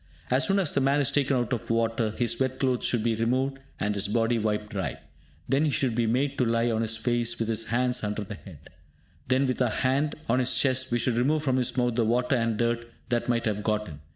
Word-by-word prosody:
As - - +3
soon 195 0 +2
as 185 -7 +2
the 140 - +1
man 135 +2 +3
is 140 - +2
taken 140 -1 +2
out 120 +1 -1
of 120 -1 -4
water, 115 -1 +1
his 120 +1 -1
wet 130 -1 0
clothes 130 -2 0
should 120 -3 +1
be 115 0 +1
removed, 130 +4 0 0.2
and 105 0 0
his 100 -1 0
body 115 +2 +1
wiped 105 0 -2
dry. 95 - -3 0.5
Then 135 +4 +2
he 155 - +2
should 135 -3 0
be 115 0 +1
made 135 +4 0
to - - +4
lie 115 0 +1
on 110 0 0
his 110 0 -1
face, 120 0 0
with 115 - -2
his 115 0 -1
hands 125 0 0
under 105 0 -2
the 105 +2 -7
head. 85 -7 -13 0.6
Then, 130 +2 +2
with 130 0 -1
our 125 - +3
hand 140 +3 0
on 120 +3 +2
his 130 0 +1
chest, 130 -1 +1
we 120 - +2
should 120 +1 +1
remove 145 +5 +2
from 130 -3 +1
his 125 0 -1
mouth 125 -1 +2
the 115 0 +1
water 125 +4 +1
and 115 -2 0
dirt 120 0 -1 0.2
that 120 0 0
might 115 -1 +1
have 105 -2 -1
got 105 0 -1
in. 75 -3 -9
120 Hz, 250 wpm, -27 LUFS, 115-130 Hz, 0.6 s, to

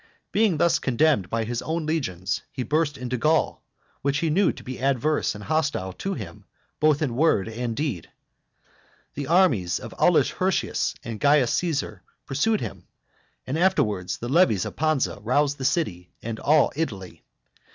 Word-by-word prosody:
Being 210 -6 +2
thus 170 +2 +3
condemned 130 - +2
by 115 0 -1
his 120 +1 -3
own 160 0 -2
legions, 95 - -2
he 130 - -4
burst 150 +1 0
into 125 -1 -3
Gaul, 155 +7 +1 0.4
which 140 +1 0
he 160 +1 0
knew 190 +4 +3
to - - -12
be 130 0 -7
adverse 140 0 +1
and 105 - -8
hostile 140 -10 -1
to 195 - -4
him 105 -9 -9 0.3
both 155 0 +3
in 125 -6 -2
word 125 -9 +2
and 115 +1 -4
deed. 135 - -3 1.0
The 140 -1 -5
armies 140 - +3
of - - -9
Aulus - - +4
Hirtius - - -1
and 115 -2 -6
Caius 145 -4 +4
Caesar 165 -6 -2 0.2
pursued 200 +11 +1
him, - - -7 0.6
and 140 +5 -2
afterwards 120 - +1
the 120 - -6
levies 125 - +3
of - - -6
Pansa 155 -8 0
roused 145 +6 +1
the 130 - -3
city 100 - -1
and 115 -1 -4
all 150 0 +3
Italy. 100 - -4
140 Hz, 160 wpm, -25 LUFS, 115-155 Hz, 1.0 s, Aulus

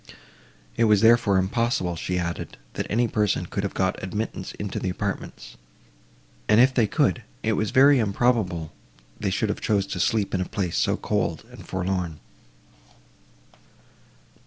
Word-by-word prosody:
It 115 - +4
was, 105 -2 +4
therefore, 115 -3 +5
impossible, 95 -2 0
she 90 +3 -3
added, 85 -1 -4 0.2
that - - -3
any 120 +3 +2
person 105 -5 0
could 100 - -3
have 100 - -4
got 95 -1 0
admittance 95 0 -4
into 105 -1 -4
the 95 - -2
apartments; 100 +2 -5 0.9
and, 105 +1 +6
if 130 +2 +5
they 115 -4 +3
could—it 110 -4 -1
was 105 0 0
very 140 +1 +6
improbable 100 -7 0 0.5
they 100 - -1
should 100 +3 0
have - - -3
chosen 100 -3 0
to 90 - -3
sleep 105 +2 +1
in 95 - 0
a - - -1
place 95 -6 -2
so - - +1
cold - - -1
and - - -12
forlorn. 90 -3 -2
100 Hz, 150 wpm, -25 LUFS, 95-115 Hz, 0.9 s, and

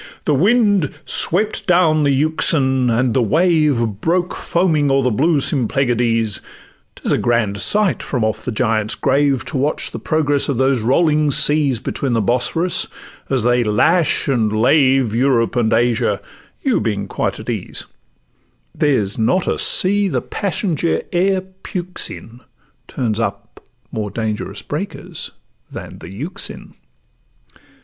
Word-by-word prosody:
The 150 - +2
wind 205 - +3 0.2
swept 210 +5 -1
down 170 -4 +3
the 145 - +2
Euxine, 135 -3 +2
and 120 +1 +1
the 130 - +2
wave 155 - +2 0.2
Broke 175 +2 0
foaming 160 -5 0
o'er 135 0 +2
the 125 - +1
blue 150 +7 +2
Symplegades; 120 -5 +1 0.5
'Tis - - -3
a - - +2
grand 110 -4 0
sight 210 -3 +2
from 125 -5 -2
off 110 -1 -2
'the 125 - -3
Giant's 110 -2 0
Grave 140 -1 +1
To 145 - -4
watch 145 +4 0
the - - -6
progress 145 -3 0
of 135 - -1
those 130 -1 +1
rolling 150 +5 +2
seas 145 -3 +2
Between 130 +1 -3
the 115 - +1
Bosphorus, 130 - 0 0.4
as 130 -4 0
they 120 0 +2
lash 155 +11 +2
and 115 -6 +1
lave 130 +1 +3
Europe 120 -1 +1
and 115 -3 +1
Asia, 115 0 +1 0.4
you - - +1
being 100 -3 -2
quite - - -3
at - - -10
ease; - - -3 0.9
There's 115 -10 0
not 175 +12 +1
a - - -1
sea 200 +2 +4
the - - -2
passenger 175 -4 -1
e'er 190 +2 +1 0.2
pukes 180 0 -2
in, 115 +2 -11 0.5
Turns 115 -4 -2
up 100 -3 -5 0.3
more 105 -2 -3
dangerous 110 0 -4
breakers 170 +8 -6 0.4
than - - -9
the - - -10
Euxine. 150 - -7
135 Hz, 140 wpm, -18 LUFS, 115-160 Hz, 0.9 s, sea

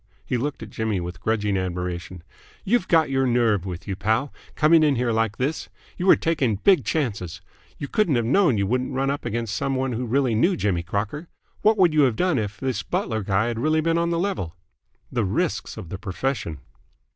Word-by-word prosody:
He - - -1
looked 135 0 -3
at 110 - -10
Jimmy 110 -3 -1
with 85 0 -6
grudging 105 -3 0
admiration. 90 -1 -4 0.4
"You'd 215 -1 +2
got 160 -4 +3
your 135 -1 +2
nerve 115 -6 +2
with 90 -2 -6
you, 95 - -2
pal, 110 +7 0 0.2
coming 160 +1 +5
in 150 -3 +3
here 120 -1 0
like 110 -1 0
this. 140 +5 -2 0.3
You 180 - -3
were - - +8
taking 140 -9 0
big 185 - +4
chances. 100 - -2 0.4
You 140 - -5
couldn't 175 -3 +1
have 120 -1 +1
known 145 - +3
you 100 - +1
wouldn't 125 +5 -1
run 135 +1 +1
up 145 - -4
against 115 -1 -2
some 135 +3 -1
one 130 0 -1
who 120 +1 -3
really 130 0 +1
knew 170 - +2
Jimmy 95 - 0
Crocker. 105 - -3 0.3
What 215 +1 +4
would 180 -5 +4
you 155 - +4
have 130 -5 +3
done 180 -1 +1
if 100 -2 -4
this 130 -2 -1
butler 110 -1 -2
guy 95 +2 +1
had 120 -1 -2
really 155 +5 +2
been 165 +1 +1
on 170 0 +1
the 170 - 0
level?" 170 - -2 0.6
"The 120 - 0
risks 125 - -1
of 100 -7 -8
the 95 - -6
profession!" 100 - -3
120 Hz, 210 wpm, -24 LUFS, 100-150 Hz, 0.6 s, were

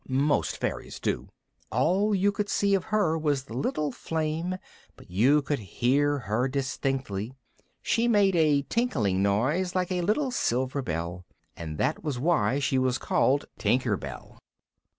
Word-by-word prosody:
Most 140 +3 +1
fairies - - -4
do. - - -2 0.4
All 185 - +2
you 200 +2 +3
could 205 0 -3
see 200 -1 +2
of 190 -2 +1
her 205 -7 +1
was 145 -4 0
the 125 - -11
little 145 +3 -1
flame, 160 +5 -2 0.4
but - - -16
you 135 +10 +4
could 145 0 -1
hear 135 +8 +1
her 120 +1 -1
distinctly, 130 -4 -2 0.5
she 230 +1 +2
made 205 -5 +4
a 150 -4 +3
tinkling 110 - 0
noise 135 - +1
like 185 0 0
a 180 -1 0
little 235 - +1
silver 130 - 0
bell, 85 -2 -4 0.3
and 80 -2 -6
that 145 - 0
was 150 -5 -2
why 135 -4 +2
she 135 -1 +1
was 130 -1 +1
called 140 +2 +1
Tinker 125 -4 +2
Bell. 70 -8 -9
140 Hz, 150 wpm, -27 LUFS, 120-175 Hz, 0.5 s, you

